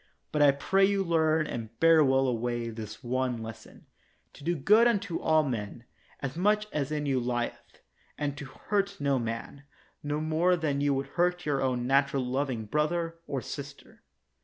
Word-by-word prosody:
But 150 - 0
I 145 - +7
pray 165 +8 +2
you 195 0 +3
learn 160 -2 +2
and 115 -5 -6
bear 165 -1 +6
well 135 -1 +3
away 120 -1 -2
this 110 +1 -8
one 125 -1 -1
lesson, 110 0 -11 0.5
To 140 - -14
do 175 +3 0
good 210 - +5
unto 200 -7 0
all 155 -1 +3
men, 115 -4 -4 0.4
as 135 0 -4
much 210 +4 +2
as 145 -1 -2
in 150 -1 -2
you 135 -2 +1
lieth, 120 -1 -4 0.3
and 145 -1 -2
to 140 - -7
hurt 195 +9 -2
no 140 -2 +1
man, 115 +4 -5 0.4
no 145 +1 -2
more 160 +4 +2
than 150 -4 -1
you 145 -1 +2
would 135 +1 -2
hurt 180 +4 0
your 145 -2 0
own 125 -2 0
natural 135 0 +2
loving 130 -3 -2
brother 165 +6 -1
or 135 -2 -2
sister. 140 -1 -9
140 Hz, 175 wpm, -29 LUFS, 125-160 Hz, 0.5 s, I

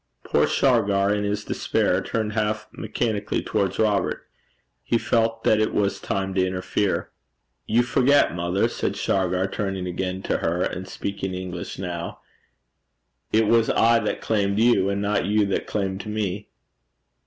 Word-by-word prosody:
Poor - - +2
Shargar 100 0 +2
in 105 0 -1
his 105 0 -2
despair 90 +1 0
turned 110 +1 -2
half 105 0 -1
mechanically 110 -4 -2
towards 95 -1 -1
Robert. 105 -2 0 0.6
He 115 - +1
felt 115 0 0
that 110 - +4
it 110 - 0
was 100 -1 +1
time 95 0 -2
to 95 -1 +2
interfere. 95 +2 -1 0.6
'You 120 +2 +3
forget, 130 - +3
mother,' 90 +2 +1
said - - -2
Shargar, 95 -1 0
turning 95 -1 -3
again 90 +1 -3
to - - 0
her, 85 +2 0
and 95 +1 -3
speaking 95 -1 -4
English 90 -1 -6
now, 85 -2 -5 1.1
'it 110 +1 +4
was 115 +1 +3
I 115 +1 +4
that 110 - -2
claimed 100 -2 0
you, 110 -4 +4
and 100 0 -1
not 100 -2 +1
you 105 0 +3
that 100 - -2
claimed 95 -2 -2
me.' 105 -1 -3
100 Hz, 150 wpm, -24 LUFS, 95-110 Hz, 1.1 s, that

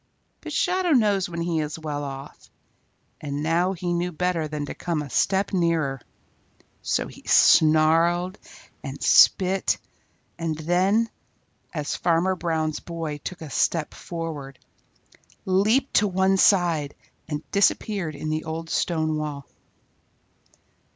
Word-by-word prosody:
But - - -8
Shadow 365 -1 +1
knows 205 -7 +2
when 170 -1 -4
he 170 -1 -1
is 150 0 -3
well 150 -2 -4
off, 135 -1 -9 0.7
and 145 0 -4
now 170 +4 +1
he 175 -1 -3
knew 175 +1 -1
better 175 -1 -1
than 150 -1 -4
to - - -6
come 165 -4 -3
a 140 - -10
step 195 +8 +1
nearer. 165 -7 0 0.8
So - - -1
he - - -12
snarled 165 +4 +4 0.4
and - - -6
spit, 190 0 +4 0.6
and 165 -2 -2
then, 185 +8 +2 0.6
as 150 -3 -3
Farmer 175 +2 +1
Brown's 160 -3 -2
boy 165 -3 -5
took 180 +4 -7
a 150 - -9
step 160 +1 0
forward, 155 -6 -6 0.9
leaped 215 +8 +2
to 210 - +4
one 190 0 +2
side 170 -7 +3 0.3
and 150 -1 -4
disappeared 200 -4 +1
in 155 +2 -4
the 155 +1 -2
old 160 +1 -5
stone 155 -2 0
wall. 145 -3 -5
165 Hz, 130 wpm, -24 LUFS, 155-185 Hz, 0.9 s, snarled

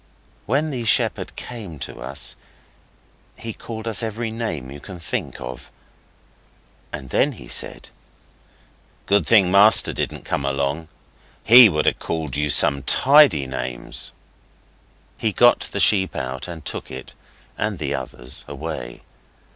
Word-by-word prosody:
When 145 +7 0
the 125 -4 -4
shepherd 110 - 0
came 105 - -8 1.6
he 115 -1 -7
called 110 +1 -8
us 110 -4 0
every 115 0 -3
name 85 - -4
you 70 - -9
can 95 +5 -10
think 80 - -4
of, 60 0 -8 1.2
and - - -8
then - - +2
he - - -12
said - - -2 1.2
'Good 100 0 +2
thing 100 -6 +5
master 100 +3 +5
didn't - - -4
come 70 - -2
along. 70 +3 -2 0.6
He 120 +1 +9
would 75 -4 -1
ha' - - +1
called 80 -5 -3
you 75 0 0
some 70 -1 +4
tidy 130 - +5
names.' 65 -2 -4 1.1
He 110 - 0
got 120 +3 +5
the - - -3
sheep 95 -3 +3
out, 65 +1 -4
and 80 -4 -9
took - - -6
it 65 0 -9 0.4
and 105 -2 -2
the 70 -3 -3
others 65 -1 -7
away. - - -7
85 Hz, 130 wpm, -21 LUFS, 70-110 Hz, 1.6 s, He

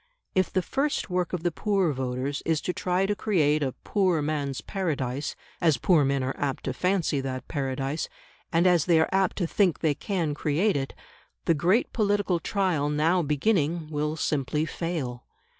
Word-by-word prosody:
If 185 -1 +1
the 185 - +1
first 275 -5 -1
work 180 -1 0
of 180 -3 -3
the 175 - +1
poor 195 -3 +1
voters 130 +2 -2
is 160 -2 +1
to 180 - -2
try 180 +2 0
to 205 +1 0
create 155 -8 +2
a 135 -3 -1
"poor 185 -5 +2
man's 145 -3 -2
paradise," 145 -8 -2 0.3
as 160 -5 +4
poor 170 -6 +4
men 135 -1 +1
are 130 +1 -1
apt 140 -2 -2
to 130 - -2
fancy 180 -3 +1
that 130 -1 -5
Paradise, 135 +1 -2 0.4
and 165 +2 +3
as 175 -4 +4
they 170 -3 +4
are 160 - +2
apt 190 -1 +2
to 180 - +1
think 180 0 +2
they 155 -3 +3
can 170 -2 -2
create 160 +8 +1
it, 135 -1 -3 0.5
the 165 - +4
great 180 - +2
political 205 -5 +1
trial 175 -7 0
now 160 +5 +2
beginning 155 +1 0
will 150 +1 -1
simply 150 0 0
fail. 155 -8 -4
160 Hz, 175 wpm, -27 LUFS, 145-185 Hz, 0.5 s, as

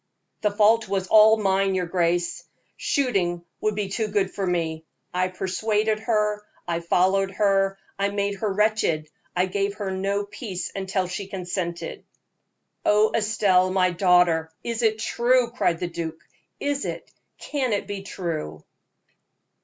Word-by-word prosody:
"The 210 - +3
fault 215 +2 +3
was 195 -1 0
all 220 0 +7
mine, 195 -2 +1
your 180 -1 0
grace; 175 0 0 0.3
shooting 185 - 0
would 215 -1 0
be 205 -1 -1
far 195 - -4
too 220 -2 0
good 200 -2 0
for 195 -2 -2
me. 165 -3 -1 0.3
I 180 0 +1
persuaded 210 +4 0
her, 210 -2 0 0.3
I 170 -1 0
followed 190 +3 +2
her, 195 -1 +2 0.2
I 200 0 +2
made 200 0 -1
her 210 +1 -1
wretched, 190 -7 +1 0.2
I 180 +1 +3
gave 200 +1 -1
her 205 -2 -3
no 200 +2 -1
peace 200 -3 -5
until 190 -1 -1
she 190 +2 -5
consented." 180 -2 -4 0.8
"Oh! 210 +1 +4
Estelle, 205 -4 +3
my 185 -1 +2
daughter, 175 -3 +3
is 235 0 -2
it 220 -2 +2
true?" 240 +2 +2
cried 175 -8 0
the 180 - -2
duke. 165 -1 -5 0.4
"Is 285 0 -1
it - - -5 0.3
can 270 -5 -2
it 205 -1 0
be 200 -1 -5
true?" 165 - -5
195 Hz, 150 wpm, -24 LUFS, 180-215 Hz, 0.8 s, all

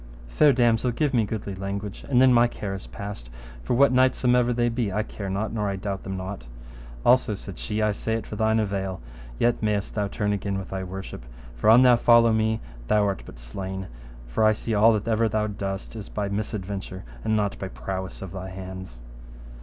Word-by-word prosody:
Fair 150 - +5
damosel, 120 -1 +3
give 145 +4 0
me 115 -3 +3
goodly 100 -1 -4
language, 100 +1 -5
and 125 -3 +4
then 130 0 +6
my 120 0 +6
care 105 -4 -5
is 95 - -7
past, 100 -13 -7 0.3
for 120 - 0
what 140 +2 +5
knights 130 0 +4
somever 125 -1 +3
they 120 0 +1
be, 115 -3 -1
I 105 +3 0
care 100 -2 -6
not, 100 +4 -2
nor 105 -3 -1
I 100 - -2
doubt 95 0 -4
them 95 0 -5
not. 95 -9 -6 0.6
Also, - - +4
said - - -9
she, 105 - -1
I 105 - +3
say 110 +2 -2
it 115 -2 -3
for - - -7
thine 110 +1 +2
avail, 95 -3 -2 0.4
yet 120 0 +2
mayest 105 -2 -1
thou 105 -2 0
turn 105 +1 -1
again 100 -1 -2
with 95 - -6
thy 95 -1 -3
worship; 95 -7 -7 0.3
for - - +2
an 120 +3 +8
thou 125 -2 +7
follow 115 -1 +5
me, 110 0 +1 0.3
thou 105 - +3
art 100 -1 -1
but - - -11
slain, 95 +11 -6 0.4
for - - -1
I 110 0 +6
see 110 +1 -4
all 110 +2 +6
that 105 +1 -2
ever 115 0 +2
thou 110 -1 0
dost 100 0 -4
is 110 -3 -7
but - - -17
by 100 -1 -1
misadventure, 100 -3 -4 0.2
and 110 - +1
not 105 -2 0
by 95 - -4
prowess 95 0 -5
of 95 - -7
thy 95 0 -6
hands. 95 -9 -8
105 Hz, 215 wpm, -25 LUFS, 95-115 Hz, 0.6 s, an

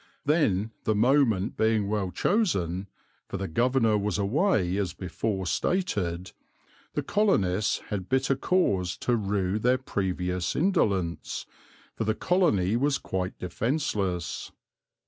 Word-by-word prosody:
Then, 115 - +2
the 110 - +1
moment 115 -3 +3
being 110 -2 +2
well 100 -2 -1
chosen, 95 - 0 0.4
for - - -4
the 95 0 -3
Governor 115 +3 +2
was 100 -1 -1
away 100 - +1
as 95 -4 -1
before 95 +1 -3
stated, 90 - -1 0.6
the - - 0
colonists 105 - +1
had 95 -3 -4
bitter 135 +1 +2
cause 100 - +1
to 120 - +1
rue 100 -2 0
their 125 +3 +3
previous 90 -7 -2
indolence, 100 - 0 0.5
for - - -2
the 110 0 +1
colony 115 - +2
was 140 +3 +2
quite 95 -1 -3
defenceless. 100 - -2
105 Hz, 120 wpm, -27 LUFS, 95-130 Hz, 0.6 s, moment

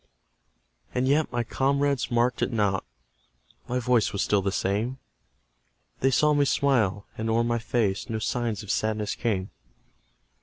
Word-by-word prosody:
And 125 +1 +1
yet 150 +3 +2
my 120 -1 0
comrades 140 +2 0
marked 120 0 +1
it - - +1
not: 100 -4 +1 0.8
My 125 - -1
voice 125 -3 +2
was 100 - -1
still 100 -1 +2
the 100 0 -1
same; 105 +7 -1 1.0
They 135 - +3
saw 150 +3 +3
me 145 -1 +3
smile, 110 -9 +1
and 110 0 -1
o'er 115 +1 +2
my 120 0 0
face 110 -4 -1
No 110 - -1
signs 115 -1 -2
of 105 - -3
sadness 110 -1 -1
came. 100 -5 -2
120 Hz, 150 wpm, -26 LUFS, 105-130 Hz, 1.0 s, They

